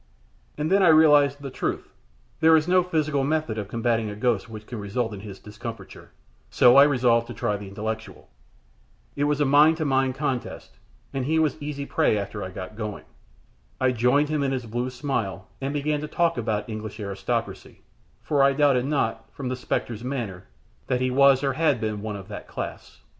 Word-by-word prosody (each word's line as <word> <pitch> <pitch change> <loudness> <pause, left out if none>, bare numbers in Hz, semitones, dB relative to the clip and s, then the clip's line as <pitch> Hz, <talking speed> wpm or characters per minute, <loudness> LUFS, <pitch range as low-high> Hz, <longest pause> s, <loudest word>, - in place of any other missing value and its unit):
And 150 +3 -2
then 195 +1 +4
I 185 - +5
realized 145 -3 +5
the 135 - -5
truth. - - -4 0.5
There 160 0 +6
is 155 +1 0
no 185 +1 +4
physical 155 -5 0
method 150 -6 -1
of 100 - -5
combating 115 0 0
a 105 - -6
ghost 115 -1 0
which 110 -1 -9
can 120 -1 -7
result 110 +3 -2
in 100 - -7
his 100 -1 -9
discomfiture, 110 +3 -9 0.4
so 125 0 +5
I 140 - +9
resolved 120 -4 +2
to 120 - -8
try 110 -4 -1
the 100 0 -7
intellectual. 110 +3 -6 0.9
It 145 - 0
was 150 0 0
a 145 - +3
mind 150 +4 +5
to 160 - -2
mind 135 -2 +1
contest, 135 -3 -4 0.3
and 135 -2 -2
he 160 +3 +1
was 155 -4 +2
easy 145 -1 -4
prey 155 -9 +1
after 100 0 -4
I 95 - -5
got 95 +2 -8
going. 105 -2 -6 0.7
I 130 -1 +3
joined 125 +5 +2
him 155 -1 0
in 135 -1 0
his 125 -2 -3
blue 120 +3 -3
smile, 120 -7 -3
and 135 +1 -2
began 145 +1 -1
to 150 - -4
talk 170 +2 +1
about 110 -4 -2
the - - -9
English 110 0 -6
aristocracy; 100 -2 -4 0.4
for 145 -2 +1
I 140 0 +5
doubted 135 -3 +3
not, 115 -6 -2
from 130 -3 -5
the 130 - -2
spectre's 120 -2 -3
manner, 120 -9 -4 0.4
that 125 - 0
he 130 0 +1
was 140 +1 +5
or 135 -1 +1
had 150 -3 +2
been 110 -2 -3
one 105 -1 -4
of 95 -2 -9
that 105 - -8
class. - - -7
125 Hz, 200 wpm, -25 LUFS, 110-145 Hz, 0.9 s, I